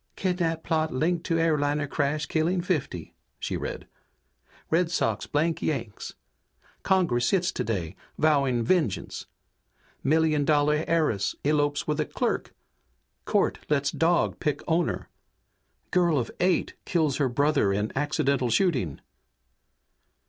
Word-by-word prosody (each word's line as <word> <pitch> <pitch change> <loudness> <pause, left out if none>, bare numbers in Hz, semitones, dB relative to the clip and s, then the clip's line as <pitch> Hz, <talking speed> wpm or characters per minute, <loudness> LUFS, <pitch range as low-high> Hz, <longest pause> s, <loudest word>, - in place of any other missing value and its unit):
"Kidnap 175 -4 -1
plot 160 -1 0
linked 165 +6 0
to 165 - +1
airliner 150 -2 +1
crash 145 +1 -1
killing 165 +4 0
fifty," 150 - -3 0.2
she - - -3
read. - - -5 0.9
"Red 165 +1 +3
Sox 115 -11 -1
blank 160 +3 0
Yanks! 120 -9 -3 0.7
Congress 170 -11 +2
sits 185 -2 +2
today, 95 -8 -3 0.2
vowing 140 -6 +2
vengeance! 140 - 0 0.8
Million 155 0 +3
dollar 150 +1 +2
heiress 155 - +1
elopes 145 0 +1
with 150 0 -1
a 155 - +1
clerk! - - -2 0.7
Court - - +1
lets 140 -1 +1
dog 170 +1 +1
pick 150 -3 -1
owner! 170 0 0 0.8
Girl 175 -4 +3
of 120 -4 -1
eight 180 -1 +1
kills 155 -6 +1
her 140 -3 +1
brother 140 -4 +2
in 105 +2 -1
accidental 140 -3 +1
shooting!" 115 - +1
150 Hz, 120 wpm, -26 LUFS, 135-165 Hz, 0.9 s, Red